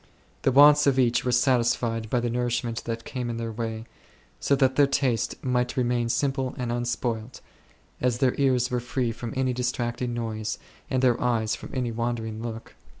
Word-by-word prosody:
The 135 - +2
wants 145 +2 +7
oi 135 -2 +3
each 120 -1 +3
were 125 - 0
satisfied 120 -3 +1
by 125 - +1
the 120 - -1
nourishment 120 -1 -2
that 115 0 -4
came 125 -2 -4
in 115 - -3
their 115 -1 -3
way, 110 0 -4 0.5
so 140 - +2
that 130 -1 +2
their 145 0 +5
taste 130 -4 0
might 125 -1 0
remain 120 -1 +1
simple 135 0 -1
and 125 -2 -2
unspoilt, 120 -1 -2 0.6
as 125 -1 +1
their 130 0 +2
ears 130 -3 +2
were 125 - +1
free 125 0 -2
from 115 0 -6
any 130 -1 +1
distracting 125 0 -2
noise, 110 -2 -3 0.3
and 130 -1 0
their 125 -2 +4
eyfes 115 -3 +1
from - - -10
any 125 -2 -1
wandering 115 -1 -3
look. 115 -1 -7
120 Hz, 180 wpm, -26 LUFS, 115-130 Hz, 0.6 s, wants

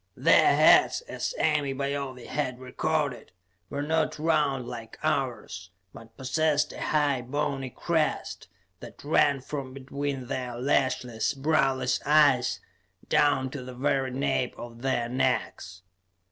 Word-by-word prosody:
Their - - +5
heads, - - +5
as - - -5
Ame 145 -3 +1
Baove 140 -3 -3
had 130 -4 -3
recorded, 140 0 -2 0.4
were 140 +1 -3
not 155 0 0
round 150 -5 +1
like 115 -2 -8
ours, 90 0 -2 0.2
but 115 0 -14
possessed 145 +3 0
a - - -8
high 145 -4 +1
bony 135 +1 -2
crest 160 +4 -2 0.3
that - - -12
ran 145 -2 +3
from 135 -1 -6
between 140 0 -4
their 125 -1 -4
lashless, 125 -1 0
browless 135 -2 +1
eyes, 145 -4 +4 0.5
down 145 -3 +2
to 140 - -6
the 125 0 -9
very 135 0 0
nape 130 -1 -1
of 120 0 -9
their 130 -3 0
necks. 90 -7 -2
135 Hz, 125 wpm, -27 LUFS, 125-145 Hz, 0.5 s, Their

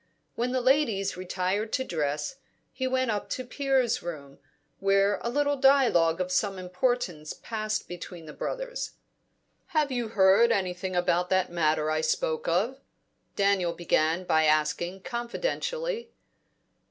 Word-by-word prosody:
When 245 +2 -1
the 255 0 0
ladies 240 -7 +2
retired 185 +4 -2
to 260 - +1
dress, 150 - -2 0.4
he 260 0 -2
went 260 -2 +1
up 205 -1 -3
to 255 - -3
Piers' 265 -1 +1
room, 145 -5 -8 0.4
where 195 +1 +3
a 235 - -2
little 285 +2 +1
dialogue 250 -12 +4
of 185 0 -2
some 190 +1 +1
importance 180 -3 -1
passed 215 -1 -3
between 175 -1 -8
the 150 - -9
brothers. - - -4 0.8
"Have 295 -3 +2
you 240 -3 -1
heard 205 +2 +5
anything 185 -2 -1
about 175 0 +1
that 185 -2 +1
matter 155 -2 +1
I 155 0 +1
spoke 155 0 -1
of?" 210 +11 +1 0.6
Daniel 195 -4 +2
began 165 0 +1
by 160 -3 +3
asking, 155 +5 +1
confidentially. 470 - -3
195 Hz, 135 wpm, -28 LUFS, 175-255 Hz, 0.8 s, heard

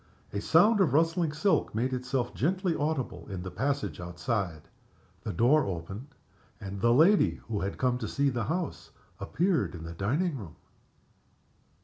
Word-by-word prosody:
A 100 - -2
sound 200 - +5
of 155 -9 +3
rustling 165 +1 +2
silk 160 - +1
made 125 +4 0
itself 125 -1 -2
gently 180 - 0
audible 135 - -2
in 95 -3 -5
the 95 - -6
passage 140 +6 -2
outside. 85 - -3 0.6
The - - -4
door 135 - +4
opened, 95 - -5 0.5
and 100 -2 -6
the 115 - +4
lady 165 - +5
who 110 -3 -2
had 100 +1 -3
come 125 -1 +1
to - - -3
see 140 0 +1
the 120 -3 -2
house 170 - -3 0.3
appeared 175 - 0
in 80 - -8
the 85 0 -6
dining 140 - 0
room. 90 -8 -9
125 Hz, 155 wpm, -29 LUFS, 100-160 Hz, 0.6 s, sound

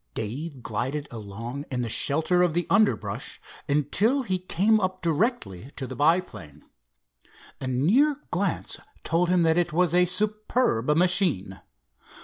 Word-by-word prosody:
Dave 130 +5 -5
glided 130 +7 -3
along 115 +5 -7
in 125 -2 -2
the - - -3
shelter 160 +9 +3
of 175 -3 +1
the 175 - 0
underbrush 210 +2 0 0.3
until 200 - +2
he 185 -5 -1
came 200 +4 +2
up 185 -2 -3
directly 155 - -1
to 135 - -3
the - - -7
monoplane. 110 - -1 0.9
A 130 - -5
near 200 - +2 0.2
glance 185 0 -2 0.2
told 170 +2 0
him 180 -1 +3
that 165 +1 +3
it 175 -1 -1
was 175 0 +2
a 180 0 +4
superb 210 - +1
machine. 175 - +2
165 Hz, 135 wpm, -25 LUFS, 130-185 Hz, 0.9 s, a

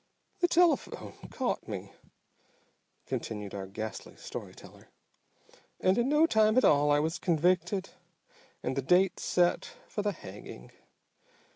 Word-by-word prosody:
"The 350 - +4
telephone 345 -1 +2 0.2
caught 260 -2 -2
me," 100 -2 -6 1.1
continued 105 -2 -4
our 95 -1 -5
ghastly 110 +2 -6
story - - -8
teller, - - -15 0.9
"and 185 +1 +3
in 240 +4 +1
no 300 +2 +5
time 220 -5 +3
at 255 - +5
all 145 0 +5
I 145 - +5
was 160 +3 -1
convicted 180 +3 +1 0.7
and 130 - -1
the 135 - 0
date 180 +7 +3
set 175 -1 +2 0.2
for 210 - -3
the 205 0 0
hanging. 95 - -11
175 Hz, 130 wpm, -30 LUFS, -, 1.1 s, no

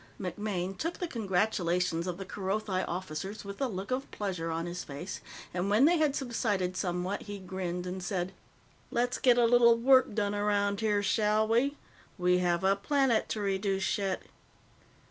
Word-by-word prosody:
MacMaine 190 0 -3
took 330 - -3
the 355 - -3
congratulations 180 - 0
of 175 -1 -3
the 195 - -6
Kerothi 190 0 -2
officers 185 +3 -5
with 200 +5 -7
a 270 - +2
look 200 0 -5
of 265 +2 -2
pleasure 180 -5 -3
on 165 +1 -2
his 175 +1 -5
face, 150 +7 -7 0.3
and 180 +2 -1
when 215 +7 +5
they 340 +1 +4
had 300 -3 +2
subsided 210 -8 -1
somewhat, 180 +2 -2
he 205 -1 -6
grinned 180 -2 -4
and 185 +1 -4
said: 180 0 -2 0.6
"Let's 245 +1 0
get 245 -2 +5
a 240 - +5
little 235 0 +6
work 260 -2 +4
done 205 -2 0
around 205 -1 +1
here, 210 -2 +1
shall 215 +1 +2
we? 260 +6 +2 0.4
We 180 0 +3
have 175 0 +1
a 195 +1 +4
planet 255 +2 +1
to 215 - -2
reduce 195 0 0
yet." 195 -2 -1
200 Hz, 170 wpm, -30 LUFS, 180-225 Hz, 0.6 s, little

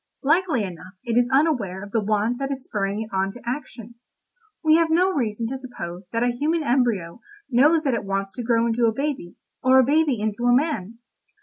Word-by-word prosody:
Likely 315 - +2
enough 185 0 -8
it 235 -3 -2
is 245 +1 +3
unaware 250 - +1
of 205 - -10
the 225 - +1
want 215 +4 0
that 275 0 -2
is 270 -2 -4
spurring 205 -2 -2
it 220 - -12
on 190 0 0
to 245 - -12
action. 240 -3 -6 0.7
We 315 0 +5
have 330 -1 +2
no 360 +4 +3
reason 230 -5 -1
to 265 - -3
suppose 190 -9 -8
that 230 +1 0
a 245 - +2
human 305 +6 -1
embryo 235 - 0 0.3
knows 300 +6 +4
that 270 -4 +1
it 230 - -1
wants 195 0 -3
to 240 - -5
grow 230 0 +2
into 235 0 +2
a - - +3
baby, 275 -10 -3 0.3
or 260 +1 +5
a 260 - +7
baby 290 -3 +2
into 215 +3 -2
a 245 - +5
man. 245 - -1
240 Hz, 210 wpm, -23 LUFS, 210-275 Hz, 0.7 s, a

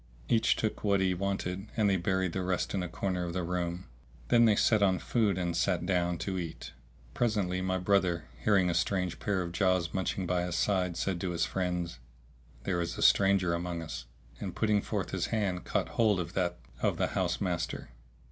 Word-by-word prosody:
Each 115 0 +3
took 110 - -2
what 100 -2 +3
he 95 -1 +2
wanted 95 +1 -2
and 110 -2 +3
they 100 - +3
buried 95 0 0
the 95 - -1
rest 90 -1 -1
in 95 - 0
a 90 - -3
corner 90 +1 -2
of 85 -1 -4
the 90 0 -1
room. 90 +1 -2 0.4
Then 120 0 +6
they 110 -2 +5
set 110 +1 +3
on 95 -2 +4
food 105 -4 +1
and 85 -2 -1
sat 85 0 +1
down, 90 -2 +1
to 95 -2 -2
eat. 85 -2 -6 0.4
Presently 100 -6 0
my 95 0 0
brother, 90 -3 +2 0.2
hearing 100 -3 +4
a 85 - +1
strange 90 0 0
pair 100 -3 0
of 85 - -5
jaws 90 -2 +1
munching 95 0 -1
by 90 0 +1
his 90 0 -2
side,[FN#651] 90 -2 +1
said 90 -2 -1
to 95 - -1
his 85 -1 0
friends, 90 -6 -2 0.6
"There 90 +1 0
is 85 0 -3
a - - -1
stranger 95 -3 +4
amongst 85 -1 -3
us;" 70 -5 -6 0.3
and, - - -5
putting 105 -2 +2
forth 100 -3 -3
his 95 -3 -1
hand, 100 -5 -1
caught - - -1
hold 110 -5 +2
of 85 - -4
that 90 -2 0 0.2
of - - +1
the - - +1
house - - -1
master. 90 -4 -2
90 Hz, 205 wpm, -30 LUFS, 85-100 Hz, 0.6 s, Then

